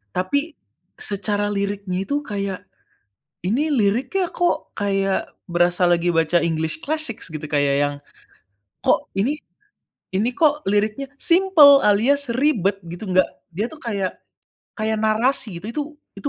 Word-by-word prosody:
Tapi, 185 +11 +1 0.6
secara 205 +1 0
liriknya 200 -2 -2
itu 285 +8 -1
kayak 200 -5 -4 0.8
ini 260 - 0
liriknya 255 - +1
kok 350 0 -1
kayak 195 -1 -1 0.2
berasa 175 +1 +2
lagi 175 0 +2
baca 165 +1 +2
english 160 -1 0
classic 310 -6 0
gitu 155 -2 -5
kayak 145 -2 +2
yang, 145 0 0 0.9
kok - - +2
ini, 235 +10 0 0.8
ini 225 +6 +1
kok 300 +1 +2
liriknya 215 +7 -1
simple 335 -6 +6
alias 240 +6 +3
ribet 225 - +1
gitu 175 +5 -7
nggak, 185 0 +4 0.2
dia 200 +7 -2
tuh 315 +1 -13
kayak 200 -6 -2 0.6
kayak 215 0 -1
narasi 220 -1 +1
gitu. 205 - -9
Itu 295 - -2 0.3
itu 285 - -3
205 Hz, 130 wpm, -21 LUFS, 185-275 Hz, 0.9 s, simple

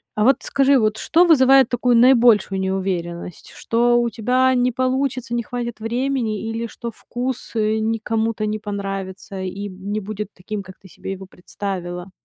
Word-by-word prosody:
А 215 - +1
вот 265 +2 +5
скажи, 275 0 +3
вот 215 -2 +1
что 335 +10 +3
вызывает 270 -5 +6
такую 245 0 +2
наибольшую 230 -6 +5
неуверенность? 185 -3 -3
Что 240 +1 +2
у 235 - 0
тебя 250 +4 +2
не 250 0 +2
получится, 255 -1 -1
не 235 - -1
хватит 240 -1 -5
времени 235 -1 -1
или 230 +1 -3
что 235 +1 -6
вкус 245 +3 -5
не 220 +1 0
кому-то 220 0 -1
не 210 0 -1
понравится 195 -2 -5
и 195 +2 -5
не 200 +3 -4
будет 210 0 -5
таким, 200 +2 -6
как 185 0 -14
ты 190 - -16
себе 190 - -8
его 190 -1 -7
представила? 180 -1 -6
220 Hz, 160 wpm, -21 LUFS, 195-245 Hz, -, вызывает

